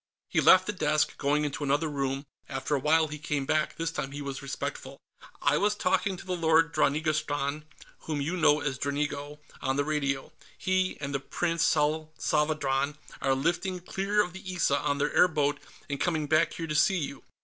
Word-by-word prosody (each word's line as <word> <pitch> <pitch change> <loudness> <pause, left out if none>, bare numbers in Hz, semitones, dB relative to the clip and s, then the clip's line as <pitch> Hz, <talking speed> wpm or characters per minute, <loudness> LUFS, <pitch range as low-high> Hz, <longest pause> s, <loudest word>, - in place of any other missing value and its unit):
He - - +2
left 185 0 +7
the 210 - -2
desk, 155 -4 +1
going 150 +1 +1
into 145 +1 -3
another 145 +3 +1
room. 135 -1 -2 0.2
After 135 +2 -3
a 140 - +2
while, 155 +3 +3
he 150 0 -6
came 145 -2 -2
back. 155 +2 0
This 165 -1 -1
time 135 -4 -4
he 145 - -5
was 135 0 -5
respectful. 140 -1 -5 0.5
"I 145 +1 +3
was 210 +1 +2
talking 190 -1 0
to - - -11
the 185 -1 -2
Lord 165 -1 +3
Dranigrastan 150 -1 0 0.3
whom 155 -2 -3
you 155 +6 -1
know 155 -3 +4
as 135 -3 -2
Dranigo 145 +1 -2 0.2
on 135 - 0
the 145 - +1
radio. 145 -1 -1 0.2
He 185 0 0
and 140 -1 -4
the 140 - 0
Prince 165 +4 -2
Salsavadran 150 -2 +1 0.3
are 135 -1 +2
lifting 175 +6 -1
clear 195 +3 0
of 180 - -7
the 190 - -9
Issa 145 -4 +2
in 140 - +1
their 145 +1 0
airboat 150 -5 +3 0.3
and 140 -1 -4
coming 160 -4 +1
back 155 +2 +2
here 165 - -4
to 155 - -3
see 165 +5 +4
you. 145 -4 -5
150 Hz, 190 wpm, -28 LUFS, 140-165 Hz, 0.5 s, left